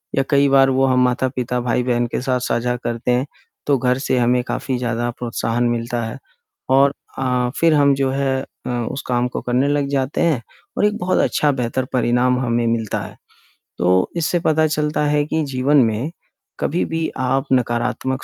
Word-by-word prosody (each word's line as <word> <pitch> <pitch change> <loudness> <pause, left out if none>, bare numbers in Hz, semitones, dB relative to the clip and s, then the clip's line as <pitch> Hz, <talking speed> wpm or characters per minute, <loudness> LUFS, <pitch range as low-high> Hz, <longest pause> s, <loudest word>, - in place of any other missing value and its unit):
या 135 - +2
कई 140 -1 +4
बार 135 0 +5
वो 135 0 +2
हम 130 -1 +2
माता-पिता, 125 0 -1
भाई-बहन 120 0 0
के 120 - -3
साथ 130 -1 0
साझा 120 0 -1
करते 120 +1 -2
हैं, 125 +2 +1 0.4
तो 140 - +3
घर 125 0 +1
से 130 -2 0
हमें 125 +1 +2
काफ़ी 130 0 -3
ज़्यादा 120 -1 -2
प्रोत्साहन 120 0 -1
मिलता 120 0 -2
है 115 - -5 0.5
और 135 +1 +4 0.3
अ, 125 -2 0
फिर 165 -1 +4
हम 140 -1 +4
जो 135 -1 0
है 135 -1 0
अ, - - -11
उस 120 +2 -3
काम 125 0 +1
को 125 - -5
करने 125 +3 +1
लग 145 -1 +1
जाते 135 0 -1
हैं 160 -8 +2 0.4
और - - +3
एक 210 +1 +1
बहुत 185 -4 0
अच्छा, 150 - +2
बेहतर 125 -1 -2
परिणाम 125 0 +2
हमें 120 0 0
मिलता 115 -3 -1
है। - - -9 0.6
तो 90 +1 +2
इससे 170 +1 +1
पता 160 -1 +2
चलता 150 0 -1
है 145 0 +2
कि 160 +1 -1
जीवन 135 +3 +2
में 115 +8 -2 0.5
कभी-भी 165 0 -1
आप 130 +1 0
नकारात्मक 125 +1 -1
130 Hz, 180 wpm, -20 LUFS, 120-140 Hz, 0.6 s, बार